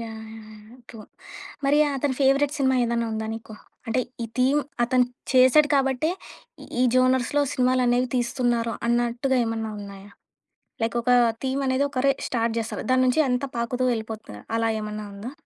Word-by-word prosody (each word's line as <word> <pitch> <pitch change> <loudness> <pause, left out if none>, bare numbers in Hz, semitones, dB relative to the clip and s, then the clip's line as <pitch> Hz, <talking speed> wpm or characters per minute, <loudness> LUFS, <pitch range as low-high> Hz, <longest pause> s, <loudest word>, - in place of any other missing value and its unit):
Yeah! 230 -1 -6 0.2
Yeah! 220 -1 -11
Yeah! 215 +3 -15
True. 230 - -11 0.7
మరి 290 +2 +3 0.2
అతని 270 -1 -1
favourite 275 +2 +3
cinema 265 -1 +2
ఏదన్నా 235 0 0
ఉందా 220 0 -3
నీకు? 225 -1 -10 0.3
అంటే 255 +3 +1 0.2
ఈ - - -2
థీమ్ 270 +4 +3 0.2
అతను 250 0 +3 0.3
చేసాడు 260 +3 +5
కాబట్టే 270 +3 +1 0.7
ఈ - - +5
జోనర్స్‌లో 255 +2 +2
సినిమాలనేవి 250 -1 +2
తీస్తున్నారు, 240 -1 0
అన్నట్టుగా 240 +2 +1
ఏమన్నా 225 -1 -3
ఉన్నాయా? 200 0 -10 0.7
లైక్ 230 +1 -1
ఒక 250 - 0 0.3
థీమ్ 265 +1 -1
అనేది 260 +2 +1
ఒకరే 275 0 +2 0.2
స్టార్ట్ 230 -2 -1
జేస్తారు. 225 -1 -4
దాన్నుంచి 255 +3 +3
అంతా 250 +2 0
పాకుతూ 240 +2 -2
వెళ్ళిపోతుంది. 220 - -6 0.2
అలా 225 0 +1
ఏమన్నా 210 0 -5
ఉందా? 220 +7 -7
245 Hz, 145 wpm, -24 LUFS, 225-260 Hz, 0.7 s, చేసాడు